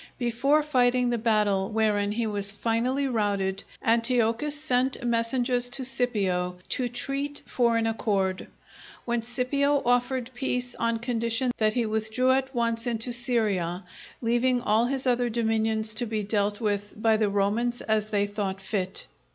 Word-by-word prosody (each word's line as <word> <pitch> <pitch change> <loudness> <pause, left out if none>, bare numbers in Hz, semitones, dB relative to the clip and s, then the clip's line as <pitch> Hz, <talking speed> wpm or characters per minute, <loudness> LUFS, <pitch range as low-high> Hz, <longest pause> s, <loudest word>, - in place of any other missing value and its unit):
Before 260 +5 +2
fighting 250 -3 +2
the 240 - 0
battle 210 -4 +1
wherein 210 -2 +1
he 230 +1 -1
was 200 -2 -2
finally 240 +6 0
routed, 200 -5 -1 0.2
Antiochus 235 +4 +2
sent 260 -4 0
messengers 245 +1 +1
to 260 +1 0
Scipio 195 -8 0
to 250 -1 0
treat 275 +4 -3
for 235 -2 +1
an 225 - 0
accord; 200 -4 -1 0.6
when 235 -1 0
Scipio 275 +4 +1
offered 245 +1 +1
peace 250 -1 -2
on 230 0 -1
condition 235 +1 -1
that 215 0 +1
he 240 -2 +1
withdrew 220 +4 +1
at 265 0 0
once 230 0 0
into 235 +1 -1
Syria, 210 -7 0 0.4
leaving 240 +2 +2
all 220 +2 +2
his 270 0 -2
other 245 -1 +2
dominions 220 -1 0
to 240 +2 0
be 215 -1 -2
dealt 205 0 0
with 205 -1 -3
by 220 0 +3
the 215 -1 +1
Romans 215 +5 0
as 215 -1 0
they 205 -1 +1
thought 200 -2 -3
fit. 195 -1 -3
230 Hz, 150 wpm, -26 LUFS, 215-245 Hz, 0.6 s, by